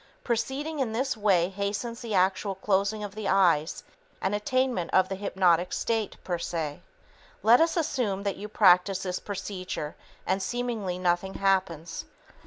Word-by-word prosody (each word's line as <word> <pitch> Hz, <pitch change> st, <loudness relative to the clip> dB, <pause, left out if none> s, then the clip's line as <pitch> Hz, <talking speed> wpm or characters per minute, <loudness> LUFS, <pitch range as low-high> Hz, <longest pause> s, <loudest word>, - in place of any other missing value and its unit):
Proceeding 275 Hz, +6 st, -2 dB
in 240 Hz, -5 st, -1 dB
this 260 Hz, +3 st, 0 dB
way 190 Hz, -5 st, +3 dB
hastens 205 Hz, +4 st, -3 dB
the 225 Hz, -4 st, -3 dB
actual 190 Hz, +2 st, +2 dB
closing 200 Hz, +2 st, 0 dB
of 205 Hz, -1 st, -6 dB
the 215 Hz, -1 st, -4 dB
eyes 175 Hz, -5 st, +2 dB, 0.4 s
and 190 Hz, -, -1 dB
attainment 245 Hz, -3 st, 0 dB
of 185 Hz, 0 st, +4 dB
the -, -, -2 dB
hypnotic 185 Hz, -3 st, +2 dB
state, 225 Hz, -3 st, -1 dB
per 175 Hz, -2 st, -2 dB
se. 160 Hz, -4 st, -3 dB, 0.6 s
Let 235 Hz, +5 st, +7 dB
us 330 Hz, +1 st, +2 dB
assume 235 Hz, -, -1 dB
that 200 Hz, -2 st, -1 dB
you 210 Hz, -, -6 dB
practice 190 Hz, -2 st, +4 dB
this 185 Hz, -1 st, -2 dB
procedure 185 Hz, -6 st, -5 dB, 0.3 s
and 190 Hz, +1 st, 0 dB
seemingly 225 Hz, -4 st, -2 dB
nothing 180 Hz, +1 st, 0 dB
happens. 185 Hz, -4 st, 0 dB
195 Hz, 150 wpm, -27 LUFS, 185-220 Hz, 0.6 s, Let